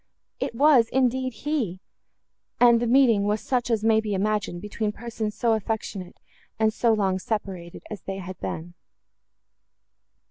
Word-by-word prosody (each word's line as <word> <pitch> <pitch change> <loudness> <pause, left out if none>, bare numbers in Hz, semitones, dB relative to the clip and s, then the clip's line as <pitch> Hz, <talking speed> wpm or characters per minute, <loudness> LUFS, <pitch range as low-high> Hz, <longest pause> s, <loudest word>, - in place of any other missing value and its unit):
It - - -3
was, 265 -4 +5
indeed, 260 0 +1
he! 245 - -1 0.8
and 235 -1 +6
the 240 - -1
meeting 235 -5 +4
was 210 +1 +1
such 245 0 -1
as 225 -2 +1
may 220 0 +4
be 210 -2 -2
imagined, 205 -2 -1
between 210 +2 -3
persons 220 -1 -5
so 235 -2 +2
affectionate, 210 -4 -4 0.4
and 220 0 +2
so 235 +1 +2
long 195 -3 +1
separated 190 -5 -5
as 210 - -6
they 195 0 -5
had 185 -1 -8
been. 170 +2 -5
220 Hz, 145 wpm, -25 LUFS, 200-235 Hz, 0.8 s, and